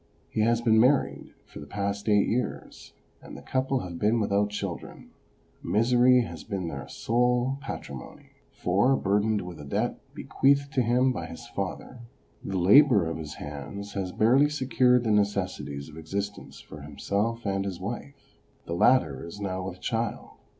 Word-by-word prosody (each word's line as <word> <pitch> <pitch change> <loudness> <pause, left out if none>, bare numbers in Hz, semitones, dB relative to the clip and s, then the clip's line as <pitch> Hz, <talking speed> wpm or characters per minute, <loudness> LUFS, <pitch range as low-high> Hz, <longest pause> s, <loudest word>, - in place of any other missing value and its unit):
He 110 - 0
has 115 +1 +2
been 110 -2 +4
married 130 +4 +2
for - - -12
the 75 - -10
past 100 +4 -3
eight 105 -1 +4
years, 125 +2 -4 0.3
and - - -10
the - - -12
couple 130 0 0
have 85 -2 -7
been 110 +3 +2
without 100 -1 +1
children; 100 -4 -6 0.5
misery 125 +6 +4
has - - -8
been 95 -4 -4
their 70 -3 -7
sole 125 +3 0
patrimony, 70 - -8 0.2
for, 100 +9 +2
burdened 105 -1 +1
with 90 -2 -8
a - - -8
debt 70 - -2 0.2
bequeathed 140 +1 +1
to 130 - +2
him 125 +2 +3
by 85 -10 -4
his 80 - -10
father, 125 - -5 0.4
the 95 - -3
labour 105 - +6
of 80 - -3
his 75 -3 -7
hands 75 +8 -7
has 95 -2 -3
barely 130 +9 +4
secured 125 -3 +2
the 110 - 0
necessities 95 -9 -1
of 80 0 -12
existence 100 +5 -5
for 75 - -11
himself 100 - -2
and 95 -1 0
his 95 -3 -5
wife. 95 -8 -8 0.3
The 85 - -4
latter 85 - +3
is 85 +5 -9
now 95 -2 -3
with 90 0 -8
child. 115 0 -3
105 Hz, 165 wpm, -27 LUFS, 90-120 Hz, 0.5 s, labour